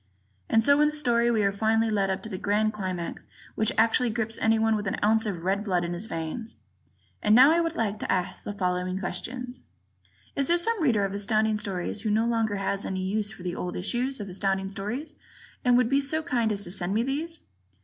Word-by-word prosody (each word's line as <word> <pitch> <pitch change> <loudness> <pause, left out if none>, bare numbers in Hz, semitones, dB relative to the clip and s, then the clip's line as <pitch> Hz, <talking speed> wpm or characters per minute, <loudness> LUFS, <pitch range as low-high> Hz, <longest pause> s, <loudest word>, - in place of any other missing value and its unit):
And 225 - +4
so 285 +4 +5
in 300 - +5
the 300 - -1
story 240 -5 +2
we 220 -3 +2
are 200 - +3
finally 220 +2 +1
led 200 -2 +1
up 190 0 -2
to 220 - -7
a - - -2
grand 215 +1 +1
climax 185 -4 -5 0.3
which 220 - +1
actually 230 +2 +3
grips 225 0 -2
anyone 225 0 +3
with 205 -1 -3
an - - 0
ounce 220 +1 +3
of 175 -5 -4
red 195 +3 0
blood 180 -4 0
in 170 - -3
his 180 +6 -5
veins. 165 +8 -5 0.7
And 210 +1 +4
now 260 +5 +8
I 335 - +3
would 330 0 -2
like 215 -5 -1
to - - -2
ask 180 -1 -1
the - - -4
following 185 -2 -1
questions: 250 +6 -5 0.7
Is 275 -1 +1
there 345 - +4
some 435 +3 +1
Reader 225 -9 +3
of 195 - -4
Astounding 215 +2 +1
Stories 200 -1 -3
who 220 - -2
no 220 +2 +2
longer 225 -3 0
has 195 0 -2
any 185 -1 -3
use 205 +2 -1
for 195 - -11
the 180 -1 -3
old 180 - -4
issues 245 +8 -1
of 205 - -5
Astounding 195 +1 -1
Stories 230 +11 -5 0.5
and 245 -1 +5
would 250 -2 +3
be 275 +3 +2
so 310 +3 -1
kind 240 -8 0
as 200 -1 -1
to 175 - -2
send 190 +1 0
me 225 - +2
these? 315 +6 -3
215 Hz, 225 wpm, -27 LUFS, 195-240 Hz, 0.7 s, now